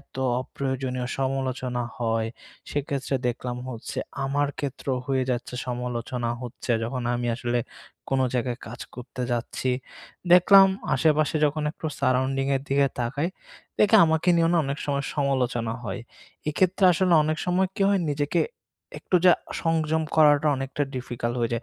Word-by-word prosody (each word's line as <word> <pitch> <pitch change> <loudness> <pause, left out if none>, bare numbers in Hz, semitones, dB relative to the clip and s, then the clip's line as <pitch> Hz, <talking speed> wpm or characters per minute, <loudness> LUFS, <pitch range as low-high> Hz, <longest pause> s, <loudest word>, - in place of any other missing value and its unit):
এত 140 - -18 0.3
অপ্রয়োজনীয় 130 -2 -3
সমালোচনা 130 -2 -1 0.2
হয়। 115 -1 0 0.4
সেক্ষেত্রে 140 -1 -2
দেখলাম 120 0 -3
হচ্ছে 115 -3 -6 0.3
আমার 145 +1 +1
ক্ষেত্রেও 135 -2 -2
হয়ে 130 -1 +1
যাচ্ছে 125 0 -3
সমালোচনা 120 -1 -3
হচ্ছে 120 +1 -6
যখন 125 +2 -3
আমি 120 0 -2
আসলে 120 0 -1 0.5
কোনো 130 -1 +2
জায়গায় 125 0 -1
কাজ 120 - -9
করতে 125 +1 -7
যাচ্ছি। 120 +2 -2 0.6
দেখলাম 195 +2 +8 0.3
আশেপাশে 155 -1 +2
যখন 150 +1 0
একটু 160 - -6
সারাউন্ডিং 130 +1 +1
এর 135 - -5
দিকে 140 0 +3
তাকাই। 135 +7 -1 0.5
দেখি 210 +1 +6
আমাকে 160 +2 +1
নিয়েও 165 -1 +3 0.2
অনেক 140 +1 -3
সময় 140 -1 -1
সমালোচনা 125 -5 0
হয়। 95 -1 -4 0.5
এক্ষেত্রে 185 +5 +2
আসলে 180 +1 +3
অনেক 155 +1 -1
সময় 185 +1 +2
কি - - -1
হয় 200 -1 +3
নিজেকে 145 0 0 0.6
একটু 180 - +1
যা 180 - +9 0.3
সংযম 160 -1 +1
করাটা 150 -1 +5
অনেকটা 135 +2 -3
ডিফিকাল্ট 120 -1 -3
হয়ে 115 - 0
যায়। 115 - -1
135 Hz, 140 wpm, -25 LUFS, 125-150 Hz, 0.6 s, যা